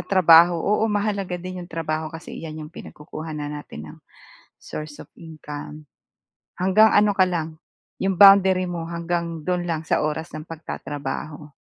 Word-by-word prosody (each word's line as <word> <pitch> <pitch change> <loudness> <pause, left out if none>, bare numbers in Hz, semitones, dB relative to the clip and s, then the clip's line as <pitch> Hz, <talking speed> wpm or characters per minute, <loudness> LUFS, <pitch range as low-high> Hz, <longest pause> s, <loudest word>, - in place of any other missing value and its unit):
trabaho. 175 -2 +6
Oo 210 +2 +2
mahalaga 200 -3 -1
din 185 +1 -7
'yong 175 - -10
trabaho 155 -1 -3
kasi 165 +1 -10
iyan 155 -1 -7
'yong 150 - -13
pinagkukuhanan 150 -1 -7
natin 145 - -8
ng - - -16 0.6
source 150 -1 -8
of - - -10
income. 150 -2 -10 0.7
Hanggang 205 +4 +5
ano 205 -1 +3
ka 185 - +5
lang 165 -3 -3 0.5
'yong 195 -1 -1
boundary 190 -2 +7
mo 170 -2 -4
hanggang 170 -1 -3
do'n 180 +2 -2
lang 165 -2 -2
sa - - +1
oras 155 +2 -3
ng 155 - -7
pagtatrabaho. 150 -2 -7
165 Hz, 150 wpm, -23 LUFS, 155-185 Hz, 0.7 s, boundary